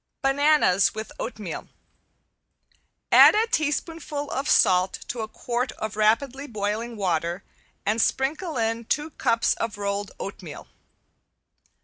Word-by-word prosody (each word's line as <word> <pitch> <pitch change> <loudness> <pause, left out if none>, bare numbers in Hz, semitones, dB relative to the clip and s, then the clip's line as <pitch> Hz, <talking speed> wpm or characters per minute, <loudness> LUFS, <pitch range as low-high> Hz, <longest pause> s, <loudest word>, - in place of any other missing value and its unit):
~BANANAS 270 -9 +3
WITH 220 0 -6
OATMEAL~ 215 -7 -6 1.4
Add - - +8
a 440 +1 +3
teaspoonful 310 -5 -2
of 275 +2 -2
salt 185 0 +4 0.2
to 245 - -4
a 220 - -3
quart 240 +3 -3
of 215 -1 -5
rapidly 245 +6 +1
boiling 215 +1 -3
water 175 -1 -1 0.4
and 215 +3 +1
sprinkle 300 +6 -1
in 225 0 -1
two 300 +6 -1
cups 230 -4 +1
of 225 -2 -4
rolled 200 0 -2
oatmeal. 180 -6 -8
230 Hz, 115 wpm, -25 LUFS, 205-285 Hz, 1.4 s, Add